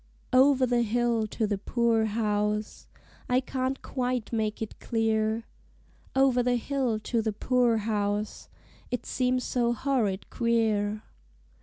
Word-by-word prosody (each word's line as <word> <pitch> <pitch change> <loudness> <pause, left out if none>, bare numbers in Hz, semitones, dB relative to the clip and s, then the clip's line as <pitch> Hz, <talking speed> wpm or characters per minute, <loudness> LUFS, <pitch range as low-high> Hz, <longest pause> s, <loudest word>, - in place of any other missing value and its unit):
Over 265 0 +5
the 245 -1 +2
hill 235 -1 +1
to 220 +1 -1
the 205 -2 -1
poor 230 +1 +1
house 210 -1 -1 0.4
I 250 +1 +4
can't 260 0 -3
quite 250 -3 -2
make 215 -1 -1
it 220 - -6
clear! 220 -1 0 0.7
Over 265 -2 +4
the 245 0 +2
hill 250 -2 -1
to 230 +1 0
the 220 0 -1
poor 245 +1 +2
house 210 -1 -2 0.4
it 245 -2 -3
seems 255 0 0
so 240 -1 +1
horrid 230 -7 -1
queer! 215 -3 +1
230 Hz, 130 wpm, -28 LUFS, 215-250 Hz, 0.7 s, Over